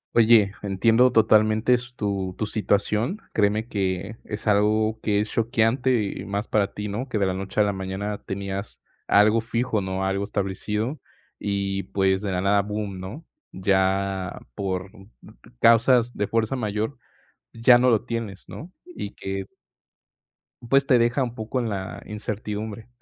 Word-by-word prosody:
Oye, 110 -3 +6
entiendo 115 +5 +3
totalmente 110 +1 +4
s 125 0 -1
tu 100 -4 -2
tu 110 - -1
situación. 105 - 0
Créeme 105 +1 +1
que 95 -1 -2
es 105 0 -6
algo 110 +1 +2
que 105 -2 +1
es 105 +1 -2
choqueante 115 +1 +1
y 100 - -5
más 100 +2 -3
para 100 -2 +1
ti, 105 0 -4
¿no?, 120 +6 -4
que 115 - -1
de 100 - +2
la 95 - 0
noche 95 +2 -4
a - - +6
la 100 -1 0
mañana 95 +2 -4
tenías 100 +1 -5 0.3
algo 105 +2 +5
fijo, 115 -1 -1
¿no?, 95 0 -2
algo 95 +1 0
establecido 105 +6 -2 0.4
y, 100 -1 -2
pues, 95 -1 +2
de 100 -2 -2
la 90 - -1
nada 100 +1 +3
bum, 105 -1 -4
¿no?, 105 - -8 0.3
ya, 95 -1 0
por 95 +3 -3 0.7
causas 120 +1 +4
de 105 - -1
fuerza 115 +2 0
mayor, 110 +1 -2 0.6
ya 120 +2 +6
no 125 +1 +3
lo 110 - +2
tienes, 115 -5 -5
¿no? 175 +4 -9
Y 345 - -7
que 95 0 -5 1.2
pues, 135 +2 +4
te 125 - +5
deja 120 +3 +2
un 120 -1 -5
poco 110 +3 -3
en 115 - -1
la 95 -2 -5
incertidumbre. 105 +1 -5
105 Hz, 155 wpm, -24 LUFS, 100-115 Hz, 1.2 s, Oye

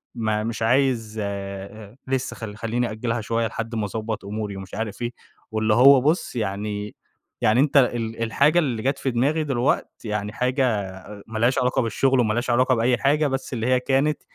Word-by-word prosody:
ما 110 -2 -1
مش 115 +1 -4
عايز 115 -2 +1
أ 100 +2 -6
لسّه 130 -1 -2
خلّ 105 -2 -7
خليني 115 +2 -1
أأجّلها 115 +1 -2
شوية 115 +1 0
لحد 115 +2 -5
ما 110 -2 -1
أضبّط 110 0 -4
أموري 105 0 -4
ومش 95 0 -9
عارف 110 0 -4
إيه. 120 0 -2 0.4
واللي 110 0 +1
هو 130 +4 +7
بُص، 155 +3 0
يعني 105 -1 -3 0.5
يعني 110 +4 +3
أنت 145 +1 +3
ال 115 -3 +1
الحاجة 140 +9 +3
اللي 125 -9 -1
جات 135 +2 0
في 135 - -1
دماغي 145 +7 +1
دلوقتي 130 -3 -1
يعني 105 0 -3
حاجة 130 +3 +1 0.2
أ 100 +2 -11
مالهاش 115 +4 +1
علاقة 125 0 +1
بالشغل 130 +3 +1
ومالهاش 120 +2 +1
علاقة 125 +2 +3
بأي 120 +2 +2
حاجة، 145 +5 +2
بس 135 0 -3
اللي 115 -1 -2
هي 130 0 +3
كانت 140 +4 +1
115 Hz, 180 wpm, -23 LUFS, 110-130 Hz, 0.5 s, هو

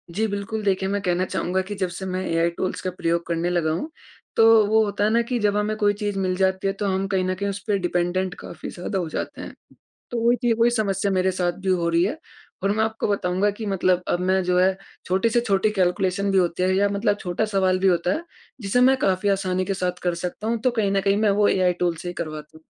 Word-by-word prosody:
जी 220 +2 +1
बिल्कुल, 205 +2 -4
देखिए 190 -1 +1
मैं 200 0 -1
कहना 180 0 0
चाहूँगा 185 +1 -1
कि 205 +2 -6
जबसे 185 -1 -3
मैं 185 0 -2
एआई 165 +1 +1
टूल्स 185 - -2
का 185 - -2
प्रयोग 170 0 0
करने 170 +1 -1
लगा 170 -3 0
हूँ। 180 - -3 0.5
तो 225 -1 +6
वो 220 +1 +4
होता 205 0 -2
हैं 215 - +3
ना 235 +1 +3
कि 240 - +1
जब 205 -1 +1
हमें 210 +1 0
कोई 205 -1 +2
चीज़ 205 -1 -3
मिल 185 -1 0
जाती 190 0 +1
है, 195 - 0
तो 205 +1 -4
हम 190 0 0
कहीं 190 -2 0
न 185 0 -1
कहीं 200 +1 -2
उस 200 0 -4
पे 205 -1 +2
डिपेंडेंट 180 +1 -1
काफ़ी - - -8
ज़्यादा 190 +2 -4
हो 165 -3 -3
जाते - - -5
हैं। - - -8 0.6
तो 235 - -1
वो 235 +1 +4
चीज़, 240 -2 +1
वो 230 - +3
ही 240 - +5
समस्या 200 -3 0
मेरे 185 0 +2
साथ 180 -1 -1
भी 190 - 0
हो 170 -2 +1
रही 170 +1 +3
है। 260 +11 -1 0.5
और 200 - +2
मैं 220 +1 +1
आपको 220 0 -2
बताऊँगा 200 0 +1
कि 215 +2 -7
मतलब 185 -2 +1
अब 175 - 0
मैं 185 +1 +2
जो 180 0 +2
है, 190 +1 +3 0.3
छोटी 190 +5 +1
से 240 +1 +2
छोटी 210 -2 +1
कैलकुलेशन 190 +1 0
भी 195 - +2
होते 180 0 +1
हैं 185 - +2
या 200 +1 +2
मतलब 205 +1 0
छोटा 180 +4 -1
सवाल 190 -3 +1
भी 195 - +2
होता 175 0 +2
है, 335 - -4 0.4
जिसे 205 +5 +1
मैं 265 +1 +6
काफ़ी 195 -2 +1
आसानी 185 -1 0
के 195 - -1
साथ 180 -1 -2
कर 175 -1 +1
सकता 180 +5 -5
हूँ। 230 0 0
तो 255 - +2
कहीं 210 -4 0
न 195 0 +1
कहीं, 200 +1 +2
मैं 215 -1 +2
वो 205 +1 +3
एआई 185 -1 +2
टूल्स 175 -2 0
से 180 - -7
ही 175 - -4
करवाता 155 -2 -7
हूँ। 160 - -21
190 Hz, 260 wpm, -23 LUFS, 180-205 Hz, 0.6 s, तो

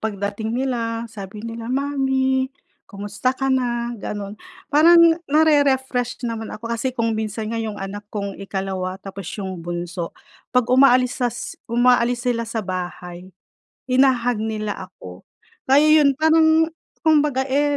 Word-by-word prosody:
pagdating 205 +1 -3
nila 235 -3 -2
sabi 210 -1 -9
nila, 230 0 -6
"mommy, 265 -1 0 0.4
kumusta 205 +4 -2
ka 270 0 0
na?" 240 -2 -1
Gano'n, 205 -1 -6 0.3
parang 325 +4 +7 0.3
nare-refresh 265 -5 +2
naman 225 -1 -4
ako. 215 +2 -9
Kasi 245 +2 -2
kung 230 -1 +1
minsan 220 0 -3
nga 230 - -2
'yong 215 -2 -4
anak 205 +1 -7
kong 200 -2 -5
ikalawa, 190 -1 -3
tapos 195 -2 -7
'yong 190 -3 -5
bunso, 175 +1 -5 0.3
'pag 250 -1 +2
umaalis 255 -1 +4
sas 240 -1 -1 0.3
umaalis 245 0 +2
sila 230 -2 -1
sa 225 -3 -3
bahay, 180 -1 -6 0.6
hina-hug 255 -3 +2
nila 215 -3 -4
ako. 90 - -13 0.4
Kaya 285 +3 +5
'yon, 280 -2 +3
parang 320 +1 +4 0.3
kumbaga, 295 -4 +3
eh, 285 +2 +1
230 Hz, 130 wpm, -21 LUFS, 205-265 Hz, 0.6 s, parang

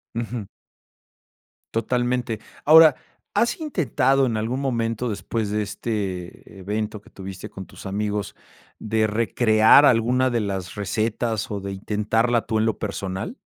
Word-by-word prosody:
Ujú. 115 -1 -4 1.3
Totalmente. 120 0 -1 0.3
Ahora, 155 -1 +8 0.4
¿has 235 - +1
intentado 135 - +1
en 115 -3 -1
algún 115 +5 -2
momento 115 -3 -1
después 110 0 -3
de 105 +1 0
este 100 -3 -5
evento 105 +2 -3
que - - -19
tuviste 95 -1 -8
con 95 - -9
tus - - -11
amigos, 105 +1 -2 0.4
de 110 0 0
recrear 110 +4 +5
alguna 125 +2 +3
de 120 - 0
las 95 -3 -4
recetas 110 +2 -1
o 100 -2 -4
de 100 - -5
intentarla 110 +4 0
tú 110 - 0
en 110 - +2
lo 110 - -1
personal? 100 - -4
110 Hz, 135 wpm, -23 LUFS, 105-120 Hz, 1.3 s, Ahora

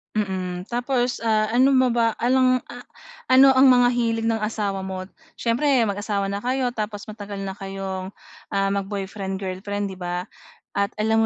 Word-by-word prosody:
Mm, 185 -3 -2
tapos, 245 0 0
ah, 215 -1 +2
ano 260 +4 +4
mo 255 -1 +4
ba, 230 -1 +2
along 255 0 +3
ah, 245 - -10 0.4
ano 265 +1 +7
ang 265 +1 +6
mga 245 -1 +6
hilig 230 -2 0
ng 225 - +1
asawa 200 -3 -2
mo? 185 0 -5 0.2
Siyempre, 235 +5 -1 0.2
mag-asawa 200 0 -2
na 200 - -2
kayo, 250 +3 0
tapos 215 -3 -5
matagal 205 -2 -7
na 195 0 -5
kayong, 195 -1 -5 0.4
ah, 195 0 +2
mag 200 0 -1
boyfriend-girlfriend, 195 0 -4
'di 190 - -8
ba? 180 0 -4 0.5
At 200 +1 0
alam 220 +1 +3
210 Hz, 160 wpm, -23 LUFS, 195-245 Hz, 0.5 s, ano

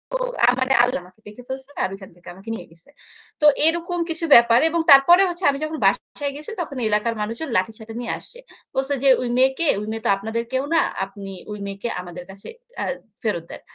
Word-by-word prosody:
ও, - - +3 0.3
আমারে 260 +1 +1
আল্লাহ 245 -3 0
আমাকে 185 +4 -19
দেখে 210 +4 -11
ফেলছে 265 +1 -6
আর - - 0
ওইখান 195 -1 -10
থেকে 175 - -21
আমাকে 195 +5 -12
নিয়ে - - -9
গেছে। 165 +6 -19 0.5
তো - - +3 0.2
এরকম 340 +2 0
কিছু 330 0 -2
ব্যাপার 235 0 +7
এবং 335 +1 0
তারপরে 280 +7 +8
হচ্ছে 350 +1 -7
আমি 275 -1 -1
যখন 310 0 -3
বাসায় 285 -2 0
গেছি 300 +8 -8
তখন 285 -5 -6
এলাকার 215 +2 +1
মানুষজন 230 +9 -4
লাঠিসোঠা 220 +4 -3
নিয়ে 240 - -3
আসছে। 485 - -14 0.4
বলছে 270 +2 0
যে, 275 - +5
"ওই 250 - -2
মেয়েকে 265 +5 +2
ওই 210 - -6
মেয়ে 225 0 -5
তো - - +2
আপনাদের 220 +3 -3
কেউ 260 +1 +1
না। - - +5 0.3
আপনি 195 0 -10 0.2
ওই 210 - -5
মেয়েকে 200 +4 -5
আমাদের 180 0 -9
কাছে 195 +1 -12 0.3
আ - - 0 0.4
ফেরত 205 -7 -1
দেন। - - -9
240 Hz, 205 wpm, -22 LUFS, 210-285 Hz, 0.5 s, তারপরে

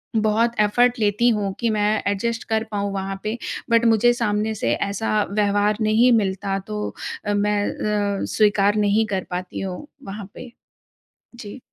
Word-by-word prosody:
बहुत 220 +2 +2
एफ़र्ट 240 +4 +3
लेती 210 +3 +2
हूँ 205 -4 0
कि 235 - +1
मैं 210 -1 +1 0.2
एडजस्ट 230 +3 -2
कर 220 0 +1
पाऊँ 200 -1 -2
वहाँ 195 0 -4
पे, 215 +3 -2 0.3
बट 230 0 +4
मुझे 230 +1 +4
सामने 220 -2 -1
से 120 - 0
ऐसा 210 - 0
व्यवहार 205 0 +1
नहीं 220 +3 +4
मिलता। 195 -1 -1
तो 210 0 -3 0.4
अ, 205 - 0
मैं 205 0 +1 0.6
अ, - - -1
स्वीकार 205 -1 +3
नहीं 215 +2 +3
कर 190 -2 -1
पाती 180 +1 -4
हूँ 190 +9 -5 0.2
वहाँ 200 +1 -6
पे। 250 - -10 0.8
जी। 235 +1 -9
210 Hz, 160 wpm, -22 LUFS, 200-225 Hz, 0.8 s, बट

